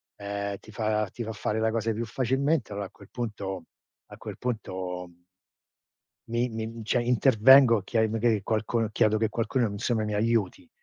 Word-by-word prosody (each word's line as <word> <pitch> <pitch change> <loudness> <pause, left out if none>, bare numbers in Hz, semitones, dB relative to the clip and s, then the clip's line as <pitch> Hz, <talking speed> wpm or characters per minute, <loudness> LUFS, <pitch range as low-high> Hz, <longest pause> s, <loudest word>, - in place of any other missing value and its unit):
ehm, 100 -1 -4
ti 110 - -15
fa 105 -1 0
ti 120 - -6
fa 110 - -4
fare 105 +1 -2
la 110 - +2
cosa 115 0 0
più 115 +2 -3
facilmente, 130 +2 0
allora 100 -1 -4
a - - -22
quel 100 - -17
punto 100 -7 -4 0.4
a - - -12
quel - - -8
punto 95 -6 -4 1.2
mi 120 +1 0
mi 110 0 -5
cioè, 120 +3 +1
intervengo, 125 -1 +6
chiedo 110 +2 +1
magari 115 -2 +1
qualcuno 110 +1 0
chiedo 110 -1 +3
che 110 0 +1
qualcuno 120 +1 0
insomma 110 +2 -1
mi 105 0 -2
aiuti. 105 -5 0
110 Hz, 165 wpm, -27 LUFS, 105-120 Hz, 1.2 s, intervengo